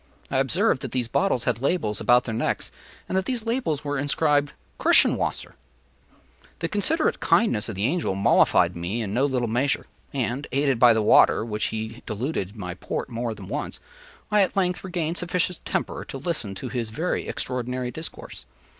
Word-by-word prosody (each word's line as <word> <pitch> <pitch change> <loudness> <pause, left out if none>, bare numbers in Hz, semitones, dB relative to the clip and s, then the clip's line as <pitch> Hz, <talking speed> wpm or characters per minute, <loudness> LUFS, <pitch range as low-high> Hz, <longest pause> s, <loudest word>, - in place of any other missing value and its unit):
I 135 - +1
observed 150 - +2
that - - -6
these 125 -2 0
bottles 130 -2 +1
had 115 - -1
labels 135 - 0
about 125 +1 +5
their 115 - -4
necks, 110 - -1 0.4
and - - -3
that 190 0 +1
these 245 -4 -3
labels 230 - -1
were 145 -1 -1
inscribed 145 0 +1 0.3
“Kirschenwasser.” - - +3 1.0
The 165 - -2
considerate 210 - +1
kindness 115 - +2
of 110 - -5
the 100 +3 -1
Angel 145 - 0
mollified 100 - +4
me 90 +7 -2
in 100 -1 -4
no 130 +5 +2
little 125 -3 0
measure; 125 +5 0 0.3
and, 130 +1 -2
aided 135 -2 +1
by 120 -1 +7
the 110 -1 +1
water 110 - +5
with 115 - -8
which 105 0 -1
he 110 +2 -4
diluted 110 - -3
my 90 -5 -5
Port 90 - -4
more 115 -1 -3
than - - -10
once, - - -4 0.5
I 210 0 +5
at 190 - +1
length 180 0 +1
regained 175 -2 -2
sufficient 180 0 -1
temper - - -2
to - - -7
listen 135 - -3
to 125 +6 -5
his 115 -2 -3
very 160 +11 -2
extraordinary 125 0 -3
discourse. 160 - -8
130 Hz, 180 wpm, -25 LUFS, 115-165 Hz, 1.0 s, by